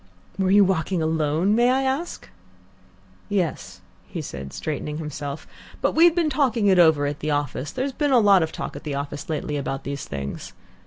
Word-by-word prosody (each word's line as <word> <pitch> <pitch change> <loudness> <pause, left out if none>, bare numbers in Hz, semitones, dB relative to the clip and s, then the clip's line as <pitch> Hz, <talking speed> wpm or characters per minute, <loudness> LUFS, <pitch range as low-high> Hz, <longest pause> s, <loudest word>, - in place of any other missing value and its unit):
"Were 190 -1 +2
you 200 +1 +6
walking 180 -2 0
alone, 160 +4 +1
may 240 +2 +4
I 265 +1 +2
ask?" 270 +6 -3 1.0
"Yes," 185 -6 -2 0.3
he - - -6
said, 70 -1 -7
straightening 150 - -4
himself; 150 -2 -6 0.3
"but - - +1
we'd 335 +1 +5
been 330 -4 +1
talking 250 -8 +1
it 190 -2 +5
over 160 -4 +5
at 145 0 -3
the 155 - -3
office. 145 -1 -2
There's 265 +7 -2
been 290 +1 0
a 260 - +6
lot 200 -4 +6
of 160 0 -1
talk - - -6
at - - -8
the 145 -3 -3
office 140 +2 -5
lately 150 -1 -2
about 135 -1 -3
these 140 -1 -5
things. 70 -1 -6
160 Hz, 190 wpm, -23 LUFS, 145-225 Hz, 1.0 s, you